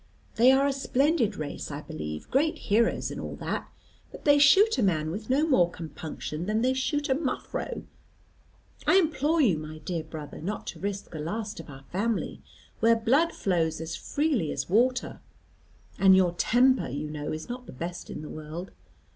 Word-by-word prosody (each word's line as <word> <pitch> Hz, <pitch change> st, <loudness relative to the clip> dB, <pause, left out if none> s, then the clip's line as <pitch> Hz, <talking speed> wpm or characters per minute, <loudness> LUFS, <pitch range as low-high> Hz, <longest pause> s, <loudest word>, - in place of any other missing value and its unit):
They 240 Hz, +3 st, +6 dB
are 270 Hz, +1 st, +4 dB
a 280 Hz, -, +2 dB
splendid 270 Hz, -4 st, +1 dB
race, 150 Hz, -2 st, -5 dB
I 145 Hz, 0 st, -5 dB
believe, 75 Hz, -, -6 dB
great 305 Hz, +4 st, +2 dB
heroes 225 Hz, +3 st, +1 dB
and -, -, -5 dB
all -, -, -5 dB
that, -, -, -4 dB, 0.4 s
but -, -, -12 dB
they 290 Hz, -1 st, +6 dB
shoot 400 Hz, +10 st, +6 dB
a -, -, +3 dB
man 160 Hz, -6 st, +1 dB
with 210 Hz, +6 st, -6 dB
no 280 Hz, +4 st, +3 dB
more 180 Hz, -, +4 dB
compunction 160 Hz, 0 st, -6 dB
than 215 Hz, +2 st, +1 dB
they 260 Hz, +1 st, +3 dB
shoot 290 Hz, +3 st, -1 dB
a 265 Hz, -, +3 dB
muffro. 275 Hz, -2 st, -3 dB, 1.0 s
I -, -, +5 dB
implore 320 Hz, -3 st, +3 dB
you, 190 Hz, -, +3 dB
my 155 Hz, 0 st, -8 dB
dear 165 Hz, 0 st, -4 dB
brother, 155 Hz, -2 st, -8 dB
not 200 Hz, +6 st, -4 dB
to -, -, -14 dB
risk 200 Hz, 0 st, -4 dB
the 155 Hz, -, -6 dB
last 210 Hz, +7 st, -4 dB
of 165 Hz, -, -10 dB
our 135 Hz, -1 st, -11 dB
family, 215 Hz, +5 st, -1 dB, 0.4 s
where 230 Hz, 0 st, +5 dB
blood 265 Hz, +9 st, +3 dB
flows 165 Hz, -5 st, 0 dB
as 160 Hz, 0 st, -4 dB
freely 285 Hz, -, 0 dB
as -, -, -3 dB
water. 250 Hz, +6 st, +1 dB, 0.8 s
And 190 Hz, -1 st, +7 dB
your 185 Hz, -2 st, +4 dB
temper, 255 Hz, +7 st, +3 dB
you 140 Hz, +4 st, -4 dB
know, 150 Hz, -1 st, -4 dB
is 155 Hz, 0 st, -5 dB
not 250 Hz, +1 st, -7 dB
the -, -, -8 dB
best 170 Hz, +6 st, -6 dB
in -, -, -6 dB
the -, -, -7 dB
world. 155 Hz, +4 st, -7 dB
210 Hz, 185 wpm, -27 LUFS, 160-265 Hz, 1.0 s, And